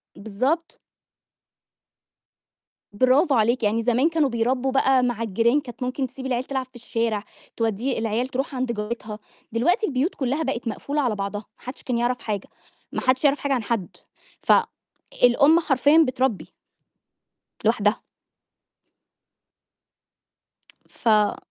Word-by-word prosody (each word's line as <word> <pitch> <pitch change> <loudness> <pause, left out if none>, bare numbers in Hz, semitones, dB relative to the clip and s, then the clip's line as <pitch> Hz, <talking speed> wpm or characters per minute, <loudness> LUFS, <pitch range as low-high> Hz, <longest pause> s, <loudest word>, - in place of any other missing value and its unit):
بالضبط. 255 - -2 2.1
برافو 260 - +3
عليكِ، 230 +2 +2
يعني 220 +2 +1
زمان 245 +6 +2
كانوا 320 -4 +1
بيربّوا 250 +3 0
بقى 265 -1 +3
مع 240 -2 -1
الجيران 230 +6 +2
كانت 250 -2 -8
ممكن 255 +1 -2
تسيب 265 +1 -10
العيال 250 -1 -1
تلعب 265 -1 -3
في 255 0 -32
الشارع، 230 -2 -2 0.3
تودّيه 230 +3 -1
العيال 225 +3 -1
تروح 270 +2 -3
عند 255 -1 -1
جارتها 215 -1 -5 0.3
دلوقتي 345 - +2
البيوت 280 +5 -1
كلّها 275 +4 -1
بقِت 260 -4 -3
مقفولة 285 +6 -2
على 245 -6 0
بعضها، 205 +1 -4
ما - - -28
حدّش 255 +2 -8
كان 250 -2 -1
يعرف 245 +1 0
حاجة، 205 -3 -4 0.4
ما - - -3
حدش 255 +2 +1
يعرف 285 0 +3
حاجة 280 -1 -1
عن 245 -4 -1
حد، 210 -5 -3 0.4
فالأم 295 - +2
حرفيًا 290 -1 +3
بتربّي 255 -4 -1 1.1
لوحدها. 215 -2 +2 2.9
ف 215 -3 +2
250 Hz, 125 wpm, -23 LUFS, 225-270 Hz, 2.9 s, برافو